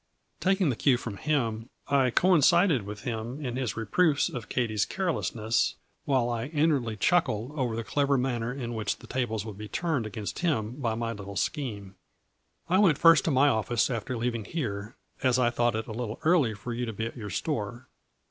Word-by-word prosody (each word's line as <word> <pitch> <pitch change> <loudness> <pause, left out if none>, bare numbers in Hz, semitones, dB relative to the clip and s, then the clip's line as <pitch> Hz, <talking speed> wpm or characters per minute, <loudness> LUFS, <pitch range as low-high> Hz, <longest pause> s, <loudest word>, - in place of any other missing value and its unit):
Taking 190 -5 +2
the - - -2
cue 130 +1 +3
from 110 -4 -6
him, 115 -6 -1 0.2
I 135 -2 +3
coincided 170 - +4
with 105 -1 -7
him 120 +1 -4
in 125 -5 -4
his 125 -6 -2
reproofs 145 - +2
of 125 -9 -7
Katies 110 -5 0
carelessness, 115 - 0 0.3
while 130 -4 +2
I 120 0 -2
inwardly 145 -7 +1
chuckled 120 - +1
over 130 -6 -2
the 115 - -3
clever 140 +3 +1
man 125 -2 -1
ner 115 +2 -2
in 125 -3 -5
which 110 -2 -2
the - - -14
tables 115 -5 -2
would 105 -2 -8
be 105 - -6
turned 150 -5 -1
against 105 0 -5
him 130 -11 0
by 115 -6 -1
my 115 0 -2
little 100 -2 -8
scheme. 105 -9 -3 0.4
" - - -48 0.3
I 185 +2 +3
went 175 -9 +5
first 165 -2 +6
to - - +2
my 135 +2 +4
office 115 +1 +1
after 120 +1 -3
leaving 115 -2 -2
here, 105 -7 -4 0.3
as 130 -1 +3
I 120 -2 +3
thought 120 -1 +1
it 110 0 -2
a - - -8
little 110 -1 -4
early 155 -10 +3
for 110 +4 -6
you 120 +1 -3
to 115 - -4
be 110 +2 -3
at 115 - -6
your 105 -5 -6
store. 120 - -3
120 Hz, 200 wpm, -28 LUFS, 110-145 Hz, 0.4 s, first